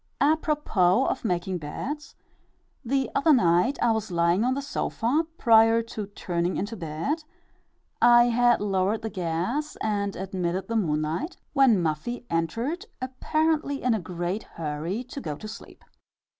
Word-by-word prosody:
Apropos 285 - +2
of - - -2
making 180 -3 -1
beds: 275 - -6 0.7
the 270 +1 0
other 295 +3 +3
night 180 +3 +3
I 240 - +4
was 220 -1 -1
lying 170 +3 +2
on 255 +2 +1
the 280 - -2
sofa, 285 +2 -1
prior 225 -1 +5
to 220 -3 -6
turning 175 -3 -2
into 205 +4 -3
bed 180 - -3 0.8
I 240 0 +7
had 240 -1 +3
lowered 200 +2 0
the 220 - -3
gas 185 - -2
and 200 -2 -1
admitted 185 -1 -3
the 230 - -3
moonlight 160 - -1 0.2
when 255 - +4
Muffie 165 +11 -3
entered, 230 - -2
apparently 285 +3 -1
in 250 -1 +3
a 220 - 0
great 175 +3 -3
hurry 165 +8 -4
to 260 +2 -8
go 150 - -4
to 215 - -9
sleep. 215 - -11
220 Hz, 145 wpm, -26 LUFS, 175-255 Hz, 0.8 s, I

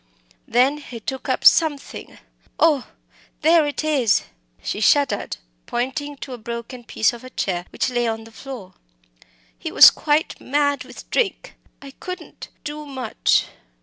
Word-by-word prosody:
Then 255 +5 +3
he 250 -5 -9
took 265 +4 -5
up - - -1
something 305 -4 +3 0.4
oh! 300 -6 +3 0.6
there 320 -1 +5
it 290 - -3
is!" 280 -8 +2 0.4
She - - -3
shuddered, 280 +5 +2 0.3
pointing 265 +4 -3
to 265 - -7
a 245 - -8
broken 235 +2 -7
piece 225 0 +1
of 240 +1 -10
a 255 - -9
chair 180 -7 -3
which 255 - -1
lay 240 -1 0
on 225 0 -3
the 225 - -14
floor. 225 -6 -9 0.8
"He - - -6
was - - +10
quite 300 +1 0
mad 285 +1 0
with - - -12
drink - - -1 0.3
I 275 - -9
couldn't 365 +4 -8 0.2
do 300 0 -5
much." 260 -5 +1
265 Hz, 150 wpm, -22 LUFS, 235-295 Hz, 0.8 s, was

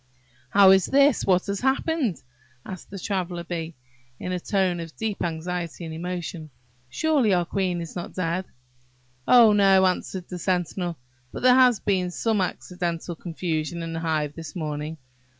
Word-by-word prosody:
"How 195 +2 +7
is 190 -1 +4
this? 280 -1 +4
what 180 -2 +3
has 200 0 -2
happened?" 265 - 0 0.4
asked 185 -2 -8
the 195 - -7
Traveller 180 -2 -3
bee, 170 -2 -5 0.4
in 180 - -4
a 180 - -1
tone 185 -2 0
of 165 -1 -8
deep 220 -2 -2
anxiety 170 +1 -4
and 160 - -6
emotion: 170 -1 -5 0.4
"Surely 275 - +2
our 175 -1 +1
queen 185 0 -1
is 165 - -8
not 175 - -6
dead?" 180 +1 -1 0.8
"Oh, 235 -4 +7
no!" 195 -2 +5
answered 185 0 -2
the 180 - -6
sentinel; 175 -1 -1 0.3
"but - - -7
there 250 0 +7
has 250 -4 +5
been 185 -3 0
some 215 +3 0
accidental 175 -2 -3
confusion 165 0 -3
in 165 0 -5
the 165 - -3
hive 155 -3 -1
this 160 -3 -8
morning. 155 -1 -4
180 Hz, 160 wpm, -25 LUFS, 165-195 Hz, 0.8 s, How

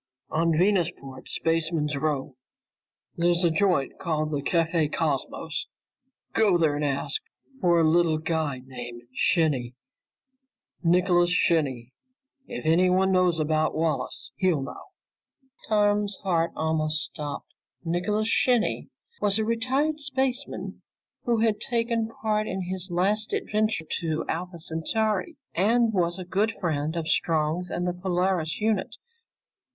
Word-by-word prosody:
"On 165 +1 +2
Venusport's 170 -8 0
Spaceman's 165 -2 0
Row. 140 -2 -2 0.8
There's 175 +1 +2
a 170 - +4
joint 180 -5 +1
called 155 -3 -1
the 145 -2 -1
Café 165 0 +1
Cosmos. 160 +1 -2 0.7
Go 205 -5 +4
there 160 -3 +2
and 150 - -2
ask 140 - -1 0.4
for 175 -4 +4
a 160 - +4
little 165 -1 +3
guy 155 -4 -1
named 120 -2 -8
Shinny. 135 -7 +1 1.1
Nicholas 175 0 +3
Shinny. 140 -8 +1 0.5
If - - -6
anyone 185 +3 +4
knows 180 -3 +3
about 155 0 +1
Wallace, 155 -2 -2
he'll 175 -7 +2
know." - - -8 0.8
Tom's 205 -1 +2
heart 170 -3 +1
almost 155 -1 0
stopped. 145 -2 -6 0.3
Nicholas 205 +6 0
Shinny 240 0 +2 0.3
was 200 0 +2
a 220 - 0
retired 260 +7 0
spaceman 265 -3 -2 0.4
who 235 -2 +2
had 220 -2 +2
taken 230 -2 0
part 215 0 +1
in 190 - -3
his 185 +1 -4
last 200 +5 0
adventure 215 -5 0
to 160 -2 -2
Alpha 175 +2 -3
Centauri, 180 +5 -1 0.2
and 225 +5 +3
was 175 -2 +1
a 185 - -6
good 205 +5 +1
friend 160 -3 -1
of 165 -2 -2
Strong's 160 +2 +1
and 175 - -2
the 180 - 0
Polaris 180 -2 0
unit. 215 -2 0
175 Hz, 125 wpm, -26 LUFS, 155-205 Hz, 1.1 s, a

